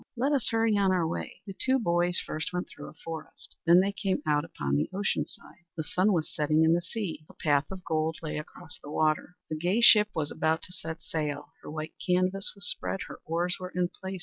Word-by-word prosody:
Let 265 +5 +2
us 275 -6 +3
hurry 225 -1 +2
on 195 -1 +4
our 175 -3 +2
way." 160 - -5
The 195 - -6
two 260 +7 +2
boys 175 -5 +2
first 155 - -3
went 180 0 -2
through - - -10
a - - -15
forest. 165 -1 -6
Then 175 +2 +8
they 195 +1 +1
came 195 -1 -1
out 150 -1 +2
upon 70 - -2
the 70 - +1
ocean 200 +2 0
side. 175 - -11
The 160 - -1
sun 185 +7 +2
was 165 -5 0
setting 155 +1 +3
in 160 +1 +5
the 175 - +2
sea. 180 -3 -4
A - - -15
path 145 -2 +2
of 190 -2 -8
gold 160 0 0
lay 150 -1 -2
across 150 0 -9
the 145 - -10
water. 155 +3 +1 0.2
A - - 0
gay 175 +7 +1
ship 210 -3 +8
was 150 -3 -1
about 160 +1 0
to 180 - -6
set 160 -1 -5
sail. 150 -2 -3
Her - - -9
white 155 +1 -5
canvas 185 +2 +2
was 200 0 -3
spread; 195 - -1
her - - -9
oars 175 +2 0
were 185 0 -5
in 180 -1 +1
place. 190 0 -7
175 Hz, 230 wpm, -29 LUFS, 155-190 Hz, 0.2 s, Then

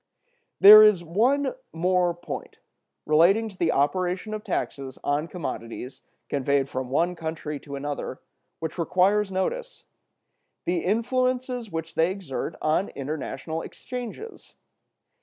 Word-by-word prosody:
There 210 +2 +11
is 210 -5 +5
one 245 - +1 0.2
more 180 0 +1
point, 175 - -7 0.5
relating 185 +9 +4
to 195 - -14
the 170 -3 +1
operation 180 +8 0
of 215 0 -5
taxes 135 - -3
on 145 +3 0
commodities 130 -7 -6 0.3
conveyed 140 0 +1
from 130 -1 -4
one 170 +6 +1
country 160 -3 -5
to 140 -1 -8
another, 140 -2 -4 0.4
which 160 +2 -5
requires 190 +4 +2
notice: - - -3 0.8
the 175 0 +1
influences 250 +2 0
which 165 -2 -5
they 165 +2 +2
exert 180 -5 -5
on 155 +5 +1
international 155 +3 -5
exchanges. 250 - -8
175 Hz, 120 wpm, -25 LUFS, 150-210 Hz, 0.8 s, There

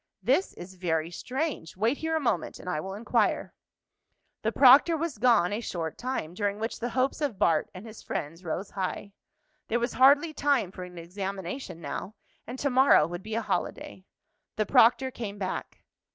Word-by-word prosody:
"This 295 +10 +2
is 180 +2 -10
very 165 -3 -1
strange. 260 - -4
Wait 230 +7 +1
here 320 0 -1
a - - +2
moment, 235 - -1
and - - -12
I 180 -4 -1
will 190 +5 -5
inquire." 220 +3 0 0.9
The - - 0
proctor 280 +5 +7
was 315 -8 -3
gone 220 -6 +4
a 215 - -2
short 165 -7 -4
time, 245 -10 -4
during 205 +1 -1
which 225 +2 -4
the 240 - -2
hopes 260 +5 0
of 275 -9 -1
Bart 160 -4 +2
and 185 +4 -9
his 220 -1 -11
friends 165 +5 -5
rose 180 +4 -4
high. 195 +1 -4 0.5
There 235 - 0
was 240 +1 -2
hardly 285 +5 +5
time 280 -10 +1
for 185 -1 -7
an 180 -1 -12
examination 190 +2 -6
now, 205 +5 -5 0.3
and 245 +3 -6
to 280 +1 -1
morrow 260 - +6
would 175 +2 -6
be 215 +2 -5
a 230 - -1
holiday. 195 -2 -3 0.5
The 215 - 0
proctor 255 +5 +4
came 210 -5 -6
back. 190 -2 -5
215 Hz, 180 wpm, -28 LUFS, 180-260 Hz, 0.9 s, proctor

